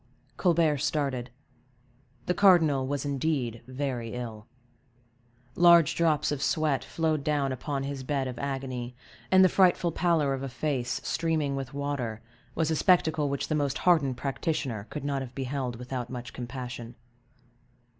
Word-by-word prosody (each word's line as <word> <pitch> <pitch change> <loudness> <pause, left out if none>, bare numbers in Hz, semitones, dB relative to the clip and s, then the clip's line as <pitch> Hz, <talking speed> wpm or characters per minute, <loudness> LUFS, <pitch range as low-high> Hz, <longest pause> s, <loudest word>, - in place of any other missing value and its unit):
Colbert 165 -4 +2
started. 140 -4 -1 1.0
The 180 - +1
cardinal 160 -9 +4
was 145 0 -2
indeed 135 -5 -1
very 130 -3 -3
ill; 115 -3 -6 1.1
large 170 -3 +6
drops 160 -4 +1
of 145 -2 -2
sweat 155 -4 +1
flowed 160 -3 -1
down 145 -2 0
upon 135 +2 -3
his 140 -1 -4
bed 135 0 -1
of 125 -2 -6
agony, 130 -3 -4 0.3
and 190 0 +7
the - - +7
frightful 180 -2 +3
pallor 165 -5 +2
of 135 - -3
a 135 - -4
face 125 -2 -2
streaming 155 -4 0
with 135 0 -5
water 140 -6 -3 0.4
was 160 -1 +1
a - - +2
spectacle 160 -4 +3
which 140 0 -2
the - - -1
most 145 -2 0
hardened 145 -8 +3
practitioner 135 -5 -2
could 150 - -6
not 140 -1 -1
have 125 -1 -8
beheld 130 -2 -3
without 125 0 -5
much 125 -2 -7
compassion. 120 -1 -7
140 Hz, 145 wpm, -28 LUFS, 125-155 Hz, 1.1 s, and